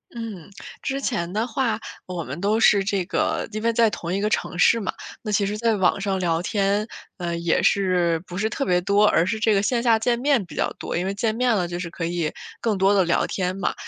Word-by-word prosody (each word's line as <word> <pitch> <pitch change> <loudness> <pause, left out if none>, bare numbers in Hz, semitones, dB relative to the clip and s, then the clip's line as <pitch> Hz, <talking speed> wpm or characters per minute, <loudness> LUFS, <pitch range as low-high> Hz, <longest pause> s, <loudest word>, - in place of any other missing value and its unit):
嗯， 215 -7 -7 0.3
之 270 +1 -2
前 185 -9 -2
的 220 +2 0
话 235 -2 -1 0.3
我 180 -3 -4
们 140 +5 -6
都 210 +4 +1
是 205 -3 +5
这 195 -1 0
个 - - -1
因 215 0 -4
为 230 0 +1
在 230 -1 +4
同 175 -4 -4
一 195 - -1
个 210 - +1
城 175 - -2
市 230 +6 +5
嘛， 200 - -3 0.3
那 215 - -6
其 200 -1 +2
实 210 +1 -2
在 230 0 +1
网 190 0 +2
上 195 -1 -1
聊 165 -1 +1
天， 200 +3 0 0.3
呃， 170 -2 -3
也 170 -1 +1
是 180 -4 +2
不 180 0 -8
是 220 +2 0
特 275 - -2
别 180 -7 +2
多， 200 +3 +3
而 170 -5 +3
是 220 +4 -1
这 220 0 +2
个 195 - +3
线 235 +3 0
下 225 -2 +4
见 235 +1 +1
面 260 -5 +2
比 150 - -12
较 - - 0
多， - - -4
因 175 - -1
为 195 - -1
见 215 +2 -1
面 250 0 +2
了 185 -5 0
就 175 0 -4
是 175 -1 -5
可 165 0 -4
以 170 -2 -1 0.3
更 220 -3 0
多 190 +1 +4
地 195 -2 +4
聊 170 -1 +1
天 185 0 -2
嘛。 190 - -1
200 Hz, 270 characters per minute, -23 LUFS, 180-220 Hz, 0.3 s, 是